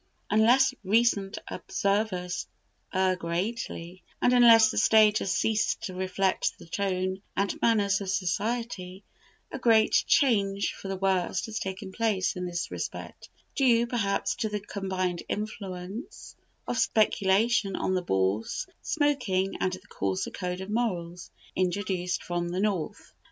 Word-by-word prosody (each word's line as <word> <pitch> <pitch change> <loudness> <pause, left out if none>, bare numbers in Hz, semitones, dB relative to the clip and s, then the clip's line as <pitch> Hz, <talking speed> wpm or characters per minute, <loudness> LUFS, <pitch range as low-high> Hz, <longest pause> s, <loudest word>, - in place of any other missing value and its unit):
Unless 245 +5 +5
recent 200 -1 +2
observers 195 -3 -1 0.4
err 185 0 +2
greatly, 180 0 -4 0.2
and 250 - +3
unless 230 -3 +7
the - - 0
stage 215 -1 +5
has 190 - -2
ceased 215 +3 0
to 195 -5 -4
reflect 185 +1 0
the - - -13
tone 185 +1 -2 0.2
and 200 -1 -1
manners 205 -3 +2
of 195 - -4
society, 195 0 -2 0.5
a 270 - -5
great 225 -3 +4 0.2
change 200 -8 +2
for - - -9
the 195 - -2
worst 190 0 0
has 220 -1 -4
taken 190 0 -5
place 205 -3 0
in 180 0 -3
this 175 -1 -4
respect, - - -6 0.2
due, 240 -4 +3
perhaps, 225 -5 0
to 225 -3 -1
the 210 0 -2
combined 190 -3 -3
influence 200 +1 -6 0.3
of 240 - -1
speculation 205 0 +2
on 185 - -1
the 185 - +1
Bourse, 95 - -1 0.2
smoking, 245 -11 0
and 185 - 0
the 185 - -9
coarser 95 -1 -2
code 180 -1 -4
of 190 - -7
morals 180 -7 -2 0.3
introduced 185 -1 -1
from 175 0 -2
the 180 +2 -2
North. 195 -6 -2
195 Hz, 135 wpm, -28 LUFS, 185-220 Hz, 0.5 s, unless